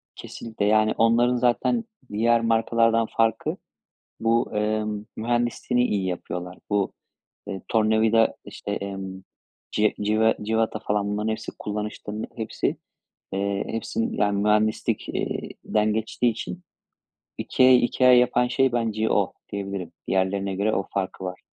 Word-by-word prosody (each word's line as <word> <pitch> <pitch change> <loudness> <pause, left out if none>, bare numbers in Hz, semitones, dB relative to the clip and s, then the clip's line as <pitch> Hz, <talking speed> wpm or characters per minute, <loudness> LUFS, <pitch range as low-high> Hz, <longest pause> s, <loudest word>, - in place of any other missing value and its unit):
Kesinlikle, 110 -3 -5
yani, 110 +1 +4
onların 120 +2 +4
zaten 125 - +2 0.3
diğer 115 +3 +3
markalardan 115 0 +2
farkı 115 0 +1 0.6
bu, 115 -1 +1
emm, 105 0 -1
mühendisliğini 120 +1 0
iyi 100 -3 0
yapıyorlar. 90 0 -5
Bu, 100 -2 +1 0.6
eee, 95 -1 -5
tornavida, 110 0 +3
işte, 100 - -6
emm, 95 -2 -5 0.5
ci 105 0 +2
cive 110 +2 +3
cıvata, 110 0 0
falan, 105 -2 0
bunların 105 +2 -1
hepsi 110 0 -4
kullanışlı, 105 0 -5 0.2
hepsi, 110 - -2 0.6
eee, 100 0 -1
hepsi, 115 - -3
yani, 100 -1 +1
mühendislik 105 +1 +1
eee, - - -3
den 105 0 +1
geçtiği 110 +2 0
için 90 -6 -6 0.8
IKEA'yı 130 -1 +5
IKEA 125 +1 +4
yapan 125 0 +4
şey 130 +1 +2
bence 110 -2 0
o - - +1 0.2
diyebilirim. 100 -3 -4 0.2
Diğerlerine 95 +1 0
göre 105 +3 +1
o 95 - -1
farkı 95 -1 -3
var. 90 -1 -6
110 Hz, 125 wpm, -25 LUFS, 100-115 Hz, 0.8 s, IKEA'yı